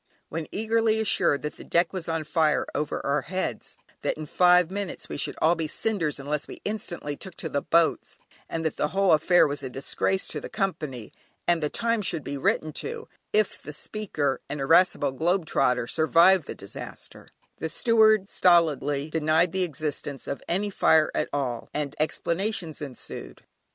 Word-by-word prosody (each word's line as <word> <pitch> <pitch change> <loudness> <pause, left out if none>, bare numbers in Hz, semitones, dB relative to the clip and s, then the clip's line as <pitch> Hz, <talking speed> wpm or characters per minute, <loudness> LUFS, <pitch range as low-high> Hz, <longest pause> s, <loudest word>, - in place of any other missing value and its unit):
When 160 0 -4
eagerly 220 +1 +1
assured 195 -9 +2
that 150 - -5
the - - -10
deck 170 +2 +1
was 180 -3 -4
on 165 -1 -1
fire 155 0 +2
over 150 0 -2
our 140 +1 +1
heads, 180 - -4 0.2
that - - -1
in 155 - -5
five 180 +2 +4
minutes 200 -2 -5
we - - -6
should - - -2
all 160 +2 +4
be 165 -2 -2
cinders 165 -4 -1
unless 145 +2 -3
we - - -9
instantly 175 -8 -3
took 185 +3 -9
to 160 - -5
the 140 -1 -1
boats, 165 +2 +1 0.3
and 165 0 -3
that 160 - -1
the 150 - +1
whole 195 +2 +2
affair 165 +3 +5
was 145 0 -2
a 130 - -5
disgrace 140 +8 -1
to - - -3
the - - -7
Company, 150 - -3 0.3
and 175 -1 +3
the 150 - 0
"Times" 230 0 0
should 165 -5 -1
be 140 - -4
written 155 +3 0
to 460 0 -6 0.2
if 215 -2 +1
the 150 - -8
speaker 150 -7 -2
(an 150 - -4
irascible 145 0 +4
"Globe 170 +6 0
trotter") 125 -5 +1
survived 165 +5 +4
the - - -5
disaster, - - -9 0.3
the 160 - -2
steward 220 +2 +4
stolidly 155 -6 +2
denied 160 +2 +2
the 190 - -1
existence 145 -4 -3
of - - -4
any 200 +4 0
fire 160 -4 +4
at 150 - -1
all 130 -4 -3
and 145 -2 -2
explanations 170 +2 -2
ensued. 120 - -8
160 Hz, 175 wpm, -26 LUFS, 145-190 Hz, 0.3 s, affair